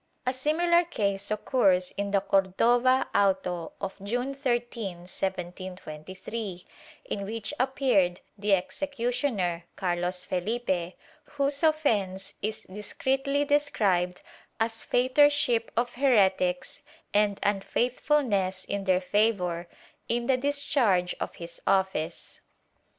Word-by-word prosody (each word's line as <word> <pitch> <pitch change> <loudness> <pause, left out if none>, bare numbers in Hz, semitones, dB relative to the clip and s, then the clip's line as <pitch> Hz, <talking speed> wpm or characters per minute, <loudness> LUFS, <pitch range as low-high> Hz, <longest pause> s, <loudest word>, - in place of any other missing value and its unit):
* - - -45
A 255 - +1
similar 340 +6 +3
case 200 - -1
occurs 200 -4 +2
in 200 0 -3
the 200 -1 +2
Cordova 235 +7 +3
auto 185 -4 +1
of 195 0 -6
June 245 +6 -2
13, 240 - -2
1723, 185 +1 -6 0.4
in 200 - -3
which 225 +5 -4
appeared 250 -9 +2 0.2
the 205 -1 +3
executioner, 235 -5 -2
Carlos 180 0 -1
Fehpe, 185 -2 -2 0.4
whose 280 0 +1
offence 225 - +1
is 215 +1 -2
discreetly 270 +8 -1
described 205 - +1 0.4
as 225 0 +1
fautorship 255 -2 +3
of 240 +1 0
heretics 195 -5 +2 0.3
and 205 -1 +2
un 200 -1 +1
faithfulness 230 -6 0
in 200 -1 -3
their 185 -1 +3
favor, 180 -4 +1 0.4
in 235 +1 0
the 265 - +3
discharge 255 -9 +1
of - - -4
his 170 0 -7
office. 190 -5 0
205 Hz, 105 wpm, -28 LUFS, 185-255 Hz, 0.4 s, similar